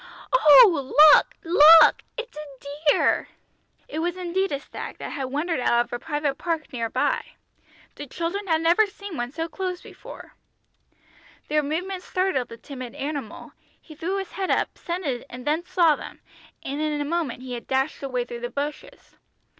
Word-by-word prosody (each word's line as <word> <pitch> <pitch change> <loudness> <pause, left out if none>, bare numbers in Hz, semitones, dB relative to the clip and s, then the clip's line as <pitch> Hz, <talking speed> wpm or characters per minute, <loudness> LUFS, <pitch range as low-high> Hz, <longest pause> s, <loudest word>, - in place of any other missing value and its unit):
Oh, 325 - +6 0.2
look, - - 0
look, 325 -1 +7 0.2
it's 480 +1 -7
a 290 +1 -5
deer!" - - +1 0.6
It 410 - -5
was 350 +2 -2
indeed 370 +2 -1
a 280 - -2
stag, - - -9
that - - -7
had 270 - -4
wandered 295 +4 -2
out 240 -1 +2
of - - -14
a 240 - -3
private 295 -2 -3
park 330 -5 -3
near. 230 -2 -2
The 290 - -5
children 345 +8 -4
had 320 -2 +1
never 350 +6 +4
seen 400 -2 -9
one 240 -1 -4
so 325 +3 -4
close 365 +1 -4
before. - - -13 1.2
Their 300 0 +2
movements 360 +6 -4
startled 365 -9 0
the 230 - -10
timid 255 -1 -9
animal, 280 -6 -6 0.3
he 315 - -14
threw 340 +6 -3
his 385 -1 -5
head 380 -1 -4
up, - - 0
scented 330 -9 -4
and 250 0 -10
then 310 +3 0
saw 350 -4 +3
them, - - -11 0.4
and 280 +2 -4
in 305 -1 -1
a 290 - -2
moment 295 -6 -3
he 255 -1 -7
had 240 - -7
dashed 265 +3 -1
away 255 -3 -2
through 240 -1 -8
the 240 0 -5
bushes. 290 +3 -7
305 Hz, 170 wpm, -24 LUFS, 270-350 Hz, 1.2 s, look